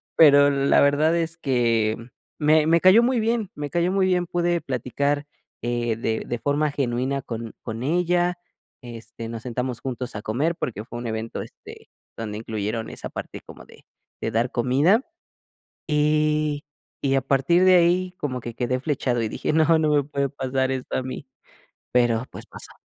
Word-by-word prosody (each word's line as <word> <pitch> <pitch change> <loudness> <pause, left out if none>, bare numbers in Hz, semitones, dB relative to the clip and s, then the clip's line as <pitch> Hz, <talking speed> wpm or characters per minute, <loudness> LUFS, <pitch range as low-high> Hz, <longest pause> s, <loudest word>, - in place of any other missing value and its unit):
Pero 145 -2 +7
la 140 0 +3
verdad 145 +3 +3
es 165 -1 -2
que, 115 -7 +1
mm, 115 +2 -13 0.3
me 155 0 +5
me 165 +1 +4
cayó 185 +5 +7
muy 245 0 +2
bien, 225 -2 0
me 145 -1 -5
cayó 175 +1 +1
muy 195 0 +2
bien. 180 -2 +1
Pude 175 0 0
platicar, 140 +3 -1 0.4
eh, 120 -1 -1
de 110 0 -2
de 120 - -3
forma 145 +4 0
genuina 135 0 -1
con 115 -2 -6
con 115 -1 -5
ella. 175 +3 +1 0.4
Este, 115 -1 -9
nos 115 -1 -6
sentamos 125 -1 -3
juntos 125 -2 -5
a 105 - -4
comer 140 +11 -1
porque 110 -9 -4
fue 120 +1 -8
un 120 - -5
evento, 110 0 -4
este, - - -12 0.3
donde 105 -2 -5
incluyeron 110 0 -3
esa - - -6
parte - - -7
como - - -13
de - - -18 0.4
de - - -2
dar 115 +2 0
comida, 140 - +3 0.8
y 150 -1 +1 0.4
y 135 -1 +1
a 135 - +2
partir 135 +7 +3
de 185 -1 +7
ahí 180 +1 +3
como 130 -4 -3
que 120 0 -7
quedé 125 +1 -1
flechado 130 -4 -1
y 110 - -1
dije: - - -2
"¡No! 160 +1 +4
No 155 -1 +2
me 145 - +4
puede 140 -1 -1
pasar 130 -1 -1
esto 130 -1 -3
a - - -1
mí", 130 +2 -7 0.7
pero, 120 -1 +2
pues, - - -9
pasó. - - -10
135 Hz, 180 wpm, -24 LUFS, 120-160 Hz, 0.8 s, Pero